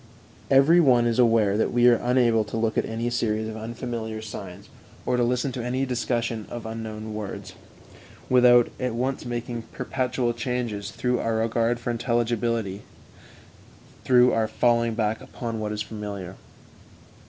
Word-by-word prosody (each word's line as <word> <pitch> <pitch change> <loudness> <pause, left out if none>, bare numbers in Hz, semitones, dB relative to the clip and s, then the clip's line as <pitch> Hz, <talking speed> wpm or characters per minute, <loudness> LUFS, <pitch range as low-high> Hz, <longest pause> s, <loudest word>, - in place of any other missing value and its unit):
Every 140 +6 +6
one 125 -7 +5
is 115 +1 +1
aware 115 -4 +4
that - - +1
we 120 0 +4
are 120 -1 +6
unable 120 -3 +3
to 105 - -5
look 110 -1 0
at - - 0
any 115 +2 -2
series 110 -2 -1
of 110 - -6
unfamiliar 110 0 -5
signs, 100 -3 -8 0.4
or - - +1
to 125 - +1
listen 125 +2 0
to 120 -1 -5
a 130 +2 -1
discussion 120 -3 -2
of 120 -2 -7
unknown 110 -1 -6
words, 105 -2 -6 0.7
without 125 -1 +5
at 125 -2 -2
once 130 +3 -2
making 120 -1 -4
perpetual 125 -1 -1
changes 115 -4 -3
through 125 +2 -1
our 115 0 -1
regard 115 +1 +1
for 120 +1 -2
intelligibility, 115 -3 -1 1.2
through 125 -1 +5
our 110 -1 +1
falling 115 0 +1
back 110 0 -1
upon 115 -3 -5
what 105 -1 -3
is 105 0 -2
familiar. 105 -4 -6
115 Hz, 155 wpm, -25 LUFS, 110-125 Hz, 1.2 s, Every